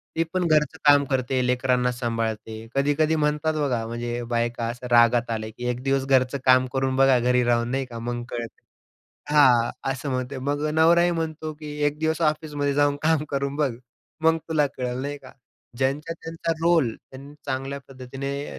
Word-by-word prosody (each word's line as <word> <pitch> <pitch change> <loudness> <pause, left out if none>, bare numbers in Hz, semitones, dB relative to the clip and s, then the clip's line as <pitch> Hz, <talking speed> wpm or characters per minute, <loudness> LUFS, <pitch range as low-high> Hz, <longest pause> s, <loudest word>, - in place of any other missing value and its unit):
ती 165 - +2
पण 185 -2 +1
घरचं 150 -3 +2
काम 145 -1 +7
करते, 130 -1 0
लेकरांना 125 0 +1
सांभाळते. 115 -2 -4
कधी-कधी 145 +3 +2
म्हणतात 150 +1 0
बघा, 135 -7 -1
म्हणजे 120 +1 -4
बायका 120 0 -1
असं 125 +1 -6
रागात 120 0 +4
आल्या 110 -1 -3
की 125 - -6
"एक 125 0 -3
दिवस 135 0 +1
घरचं 135 0 +2
काम 130 0 +5
करून 135 0 0
बघा, 135 -1 +5
घरी 125 +1 +2
राहून," 120 0 +1
नाही 135 0 -1
का. 120 -2 -8
"मग 120 +1 -4
कळेल." 120 -1 -4 0.8
हां, 125 -6 +5 0.2
असं 140 +2 -5
म्हणते. 130 +1 -3
मग 145 +3 -2
नवराही 170 +2 +5
म्हणतो 160 -2 -3
की 150 -1 -7
"एक 145 +1 -2
दिवस 160 +1 -1
ऑफिसमध्ये 150 -2 0
जाऊन 145 0 +2
काम 155 -1 +2
करून 140 0 -2
बघ, 145 -4 +1 0.5
मग 165 0 +4
तुला 155 -2 +2
कळेल," 125 -1 -3
नाही 145 +1 -4
का. 130 -2 -14 0.4
ज्यांचा 140 +5 -1
त्यांचा 165 0 -4
रोल 165 -10 +3
त्यांनी 140 +2 -13
चांगल्या 135 +1 -3
पद्धतीने 135 +2 -6
135 Hz, 170 wpm, -24 LUFS, 125-150 Hz, 0.8 s, काम